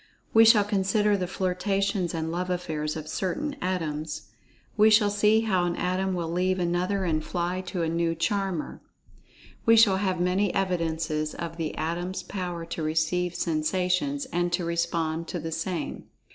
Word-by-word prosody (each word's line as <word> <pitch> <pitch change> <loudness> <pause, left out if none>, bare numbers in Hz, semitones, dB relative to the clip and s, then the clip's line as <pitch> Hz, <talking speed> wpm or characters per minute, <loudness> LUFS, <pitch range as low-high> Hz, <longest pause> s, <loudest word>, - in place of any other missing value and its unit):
We 225 0 +8
shall 220 -2 +7
consider 205 +1 +2
the 185 -2 -2
flirtations, 190 0 -1
and 160 0 -2
love 180 +2 -2
affairs 155 -4 -2
of 155 -1 -6
certain 285 - -2
Atoms. 155 -4 -3 0.4
We 215 +1 +6
shall 210 -1 +5
see 210 +2 +4
how 190 -6 +1
an 175 -1 -1
Atom 185 +1 -1
will 170 -2 -3
leave 185 +2 +1
another, 180 +3 0
and 155 -2 0
fly 180 +2 -2
to 175 -3 -2
a - - 0
new 165 0 0
charmer. 195 -1 -2 0.9
We 230 0 +7
shall 205 -4 +6
have 190 -2 0
many 180 +2 +1
evidences 160 -5 -1
of 165 -1 -6
the 160 -2 -3
Atom's 175 +4 -3
power 175 -3 -4
to 170 0 -5
receive 160 +3 0
sensations, 180 - 0
and 175 0 +1
to 175 - 0
respond 170 -1 -1
to 175 - -4
the 165 +1 -5
same. 180 +2 -3
180 Hz, 160 wpm, -27 LUFS, 165-195 Hz, 0.9 s, We